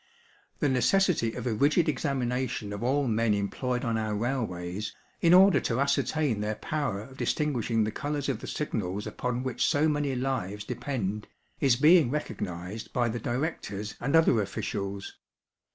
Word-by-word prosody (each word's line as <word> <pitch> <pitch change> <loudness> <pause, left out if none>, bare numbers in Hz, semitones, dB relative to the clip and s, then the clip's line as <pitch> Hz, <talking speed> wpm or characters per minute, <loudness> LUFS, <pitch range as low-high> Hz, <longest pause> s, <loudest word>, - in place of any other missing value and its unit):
The - - +1
necessity 140 - +2
of 125 - -6
a 120 - 0
rigid 145 +9 +3
examination 125 -7 -1
of 100 - -5
all 135 +3 +1
men 115 -1 +2
employed 125 +5 -2
on 115 -1 0
our 110 -1 -1
railways, 105 -5 -3 0.3
in 170 - +5
order 185 -4 +7
to 115 +1 -1
ascertain 140 -3 +1
their 105 +1 -1
power 140 -10 -2
of 130 +5 -12
distinguishing 120 -9 0
the 105 - -1
colours 145 +3 -3
of - - -1
the - - -8
signals 105 -9 -3
upon 125 0 -3
which 130 -3 -1
so 145 +2 +3
many 145 -3 0
lives 105 -6 -2
depend, 115 -5 -3 0.3
is 135 -4 +4
being 150 +1 +6
recognised 100 - -4
by 120 -1 +1
the 120 +1 -3
directors 120 -6 -3
and 135 +5 +1
other 160 -9 +5
officials. 100 0 -4
125 Hz, 155 wpm, -28 LUFS, 105-145 Hz, 0.3 s, order